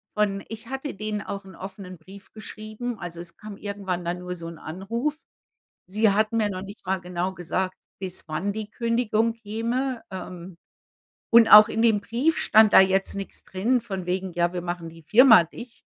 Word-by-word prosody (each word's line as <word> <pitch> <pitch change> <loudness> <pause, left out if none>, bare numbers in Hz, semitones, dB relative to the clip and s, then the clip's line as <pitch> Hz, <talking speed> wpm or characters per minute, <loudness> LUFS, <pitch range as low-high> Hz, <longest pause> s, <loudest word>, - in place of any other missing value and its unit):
von 200 -2 0
ich 225 +1 -8
hatte 270 -2 -5
denen 210 0 -3
auch 200 -1 -6
'n 190 - -13
offenen 185 -2 -9
Brief 190 +4 -15
geschrieben, 215 +2 -6
also 175 -2 -7
es 170 -1 -8
kam 210 -2 -9
irgendwann 195 -3 -4
dann 175 +1 -2
nur 180 0 -6
so 165 -1 -7
‘n 165 -1 -9
Anruf. 230 - -3 0.7
Sie 210 +3 +2
hatten 215 +3 +1
mir 215 -2 +2
noch 185 -1 -5
nicht 200 -1 -11
mal 190 0 0
genau 180 +1 -3
gesagt, 185 +2 -3 0.2
bis 185 -3 -6
wann 180 +6 -2
die 215 0 -6
Kündigung 230 -1 0
käme. 230 +3 -3
Ähm, 180 -1 -8 0.7
und 230 -1 +7
auch 210 +1 +10
in 225 - -1
dem 220 -3 +4
Brief 250 +10 0
stand 215 -1 +5
da - - +9
jetzt 190 0 +2
nix 195 -1 -7
drin, 225 +6 0
von 195 -6 -5
wegen: 185 0 -2
„Ja, 175 +1 0
wir 175 - -3
machen 175 -1 -4
die 165 0 -14
Firma 225 - +7
dicht.“ 235 +8 -12
200 Hz, 190 wpm, -25 LUFS, 180-225 Hz, 0.7 s, auch